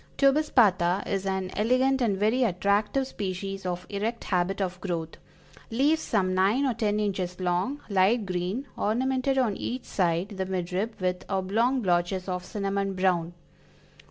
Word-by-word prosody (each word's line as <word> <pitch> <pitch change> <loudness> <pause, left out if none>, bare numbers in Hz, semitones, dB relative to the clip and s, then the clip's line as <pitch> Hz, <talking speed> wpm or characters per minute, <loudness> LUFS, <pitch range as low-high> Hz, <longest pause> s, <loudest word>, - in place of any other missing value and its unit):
Tubispatha 230 - +3
is 195 0 -2
an 190 -1 -2
elegant 255 +4 +2
and 210 -5 +1
very 220 +6 +2
attractive 205 +5 +1
species 195 -4 -4
of 180 0 -3
erect 220 +3 -3
habit 185 +1 0
of 185 -2 -3
growth; 165 -4 -4 0.5
leaves 285 +7 +2
some 185 -4 0
nine 200 +9 +3
or 260 - +1
ten 215 -2 0
inches 190 -3 -2
long, 185 +10 -1
light 200 +3 +3
green, 185 +8 -2
ornamented 260 +4 0
on 235 -6 +2
each 250 +1 -4
side 175 0 0
the 190 -3 -3
mid 180 -2 -3
rib 215 +5 -2
with 180 -1 -1
oblong 220 +7 +1
blotches 180 +1 0
of 180 -1 -3
cinnamon 195 0 -2
brown. 175 -2 +1
195 Hz, 150 wpm, -27 LUFS, 185-230 Hz, 0.5 s, Tubispatha